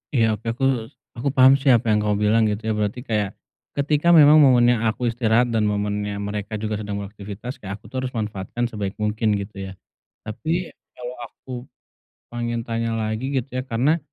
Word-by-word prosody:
Iya, 110 -3 +2
oke, 110 - -32
aku 135 - -5 0.6
aku 135 - -2
paham 130 +1 +7
sih 140 - -5
apa 120 -3 +4
yang 105 - +3
kamu 105 0 +1
bilang 110 +2 +4
gitu 110 +1 -2
ya, - - +1
berarti 105 +4 -2
kayak 105 -5 -1 0.4
ketika 150 +3 +1
memang 150 0 +8
momennya 120 -4 +5
aku 120 +2 0
istirahat 120 +1 +2
dan 110 -2 +1
momennya 105 0 -1
mereka 105 +1 -4
juga 105 0 -3
sedang 105 -1 -4
beraktivitas 105 +5 -8
kayak 95 0 -5
aku 105 +1 -17
tuh 130 - -5
harus 130 -1 -4
manfaatkan 105 +1 -3
sebaik 100 -2 -4
mungkin 105 0 0
gitu 100 -1 -5
ya? - - -8 0.5
Tapi 160 +11 -3 0.2
kalau 125 0 -7
aku 130 - -15 0.8
pengen 120 -1 -3
tanya 115 -1 -2
lagi 110 +3 -2
gitu 135 +1 -1
ya, 130 +1 -3
karena, 140 +9 +2
110 Hz, 185 wpm, -22 LUFS, 105-125 Hz, 0.8 s, memang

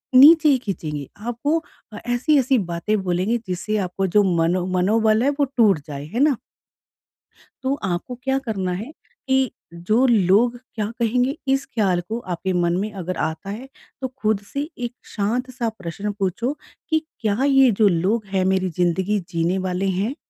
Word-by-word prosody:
नीचे 305 +3 +8
ही 270 - +5
खींचेंगे। 155 - -4
आपको 240 +9 -1 0.4
अ, 210 - -7
ऐसी-ऐसी 260 +2 +2 0.2
बातें 210 +5 0
बोलेंगे 185 +6 0
जिससे 190 +4 -2
आपको 190 +2 -2
जो 205 +3 +4
मनो 175 +2 +1
मनोबल 220 +4 +3
है 280 - +3
वो 285 - +4
टूट 205 -8 +5
जाए, 140 -1 -6
है 235 +10 -4
ना? 290 -5 +4 1.3
तो 265 +1 +1
आपको 180 +8 -3
क्या 270 0 +1
करना 190 -4 -1
है 280 - -10 0.4
कि 265 -2 +2 0.4
जो 235 +5 +4
लोग 225 +3 +3 0.2
क्या 215 -3 -1
कहेंगे 250 +5 +1 0.2
इस 270 0 0
ख़याल 190 -6 0
को 230 +2 -2
आपके 185 +2 -2
मन 175 -1 +1
में 210 +3 -2
अगर 185 -2 -4
आता 160 +5 -7
है 245 +7 -7 0.3
तो 260 - -1
ख़ुद 220 -5 -1
से 285 +3 -2 0.2
एक - - -16 0.2
शांत-सा 240 +3 -1
प्रश्न 190 +4 -4
पूछो 215 +8 -1 0.4
कि 315 -1 +3 0.2
क्या 215 +3 +1
ये 270 -2 +5
जो 210 - +7
लोग 195 +5 +1
हैं 190 - +2
मेरी 185 -1 0
ज़िंदगी 185 +4 +1
जीने 170 +2 0
वाले 185 +2 -1
हैं? 230 +8 -1
215 Hz, 165 wpm, -22 LUFS, 185-255 Hz, 1.3 s, नीचे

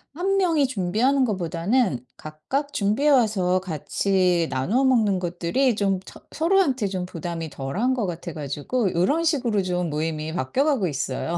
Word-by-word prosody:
1 390 +3 0
명이 330 -7 +3
준비하는 250 +6 +1
거보다는 180 - 0
각각 265 - -4
준비해 215 +9 +1
와서 205 -8 +3
같이 180 +1 0
나눠 195 - +1
먹는 220 -8 +3
것들이 180 +8 0
좀 195 -2 0
처 - - -13
서로한테 315 - +2
좀 185 -2 -3
부담이 165 -2 -5
덜 135 +5 -5
한 255 +2 +2
것 225 -7 -1
같아 170 -1 -6
가지고 155 - -2
요런 285 - +2
식으로 245 - +1
좀 180 -2 -1
모임이 155 +1 -3
바뀌어 175 - 0
가고 260 - +1
있어요. 150 +3 -2
195 Hz, 320 characters per minute, -24 LUFS, 170-260 Hz, -, 명이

